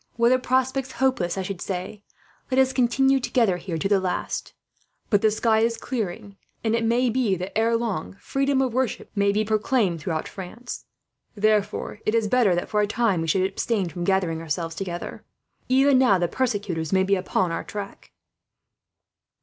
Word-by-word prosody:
Were 235 0 +4
the 255 +1 +4
prospects 260 +1 0
hopeless, 255 -10 0
I 190 - -1
should 185 -1 -5
say, 190 +2 -5 0.5
'let 260 - 0
us 265 0 +3
continue 265 +2 +3
together 230 -7 +1
here, 175 -1 -4
till 160 - -1
the 200 -1 +4
last;' 185 -1 -3 0.6
but 205 -2 +4
the 220 - +4
sky 220 +1 +2
is 230 +1 +1
clearing, 210 -4 -4 0.3
and 220 -1 +1
it 230 - 0
may 240 +2 +2
be 230 -5 +1
that, 185 +1 -6
ere 230 +1 +3
long, 200 - -3
freedom 275 0 +1
of 255 -3 -2
worship 255 -1 -2
may 200 -1 +2
be 215 +2 0
proclaimed 215 - +1
throughout 155 0 -2
France. 215 +6 -8 0.5
Therefore 210 -1 0
it 215 - 0
is 225 -2 +2
better 215 -5 +3
that, 175 - -2
for 210 - +2
a 205 - +1
time, 210 -5 +1
we 165 - -3
should 185 +4 +2
abstain 195 0 -1
from 175 +2 -5
gathering 175 -3 +1
ourselves 165 +1 -3
together. 175 0 -6 0.5
Even 265 +1 +5
now, 245 -7 +5
the 175 -1 +1
persecutors 200 -9 -2
may 190 0 +3
be 195 +1 +2
on 185 -1 0
our - - -3
track." 200 -1 -8
210 Hz, 180 wpm, -24 LUFS, 185-245 Hz, 0.6 s, Even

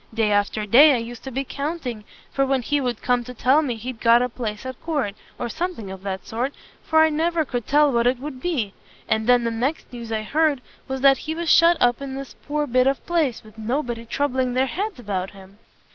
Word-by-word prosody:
Day 220 -2 +1
after 205 +1 +1
day 275 +7 +7
I - - +1
used 235 0 -7
to 265 - -5
be 270 +2 -2
counting 275 -6 -5 0.3
for 275 - +1
when 270 -2 +1
he 290 +3 0
would 245 -3 -3
come 245 -1 +2
to 250 +1 -9
tell 265 +6 +4
me 260 -6 -2
he'd 225 +1 -7
got 235 +1 +5
a 250 - -1
place 225 -1 -5
at 260 -1 -7
court, 285 -11 -1 0.2
or 240 - -3
something 315 - -4
of 190 -1 -8
that 190 -1 -5
sort, 250 +5 -3 0.3
for 315 0 +3
I 315 - +4
never 320 +1 0
could 245 -4 -4
tell 295 0 +4
what 235 -1 +2
it 250 +1 +2
would 265 -2 -7
be; 255 - -1 0.3
and 220 +1 0
then 245 -1 +5
the 230 - 0
next 255 +6 -2
news 235 -2 -7
I 220 -1 -1
heard, 300 +2 +1 0.3
was 265 -1 -4
that 270 0 +5
he 315 - -1
was 335 -1 0
shut 335 +1 +6
up 245 +1 +2
in 270 -1 -5
this 275 -1 -7
poor 295 0 0
bit 255 -1 +2
of 275 0 0
place, 315 -9 0
with 215 0 -16
nobody 240 0 -2
troubling 260 -1 -1
their 260 +1 +3
heads 390 - -3
about 195 -5 -3
him! 195 +2 -15
255 Hz, 235 wpm, -23 LUFS, 230-290 Hz, 0.3 s, day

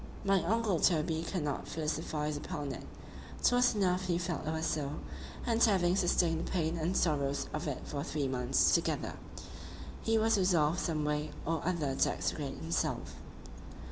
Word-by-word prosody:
—My 195 -1 +4
uncle 215 -2 +1
Toby 160 -1 +2
could 180 -5 -1
not 145 -2 -3
philosophize 155 -1 -2
upon 145 -1 -4
it;—'twas 245 - -1
enough 185 -2 +1
he 175 -2 +1
felt 175 -3 -3
it - - 0
was 160 0 -2
so,—and 155 - -2
having 185 -5 +4
sustained 175 -3 +2
the - - -4
pain 165 -2 0
and 170 +3 0
sorrows 140 -4 +1
of 155 0 -3
it 140 - -3
for 140 - -4
three 150 -3 -2
months 130 0 +2
together, - - 0 0.9
he 225 0 +2
was 220 -1 +3
resolved 175 -3 +3
some 155 -3 -1
way 150 0 -1 0.2
or 165 0 0
other 160 -6 0
to - - +2
extricate 140 -3 -3
himself. 80 -4 -2
160 Hz, 155 wpm, -32 LUFS, 150-185 Hz, 0.9 s, My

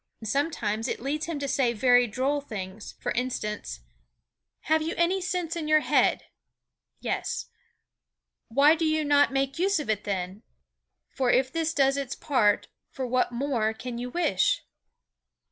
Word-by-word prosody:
Sometimes 225 -3 -1
it - - -3
leads 295 +5 -2
him 335 -3 -3
to 285 0 -3
say 255 -3 +1
very 245 +2 +4
droll 270 +6 0
things; 205 -5 -7
for - - -2
instance: 210 - -3 0.8
"Have 315 0 +2
you 320 +2 -2
any 360 +3 +2
sense 355 -2 -2
in 325 -3 -3
your 310 0 +5
head? - - +2 0.8
Yes. - - -3 1.0
Why 280 +6 +5
do 330 0 -1
you 310 -1 +1
not 285 -1 +4
make 275 +2 -1
use 390 0 +2
of 285 -7 -1
it 210 -1 -2
then? 190 0 -3 0.7
For 260 -2 0
if 260 +1 +3
this 330 -1 0
does 275 -2 +2
its 270 -2 -3
part, 220 -8 +2 0.2
for 260 - -4
what 250 0 +1
more 235 -4 -1
can 240 +1 -6
you 250 +1 -4
wish?" 310 - +1
270 Hz, 155 wpm, -27 LUFS, 230-310 Hz, 1.0 s, your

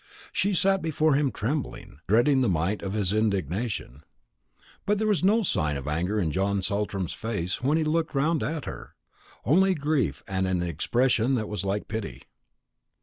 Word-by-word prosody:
She 195 0 +1
sat 195 +1 +3
before 155 -1 +2
him 140 -1 +2
trembling, 125 - -4
dreading 120 +7 +4
the 125 - +2
might 90 +4 0
of 95 0 -4
his 100 -3 +1
indignation. 100 - -1 0.8
But 210 +1 +1
there 220 - 0
was 210 -4 +1
no 215 +4 +4 0.4
anger 85 +7 -1
in 85 -6 0
John 95 +3 0
Saltram's 100 -2 -2
face 100 -6 -3
when 140 +5 +2
he 160 - +1
looked 160 0 0
round 155 +3 +2
at 155 -2 -3
her; - - -8 0.5
only 190 +7 +4
grief 140 - 0
and 95 -1 -1
an 90 -1 0
expression 120 - +1
that 110 -3 -2
was 105 -1 -3
like 100 +1 -2
pity. 100 - -5
110 Hz, 160 wpm, -26 LUFS, 95-155 Hz, 0.8 s, dreading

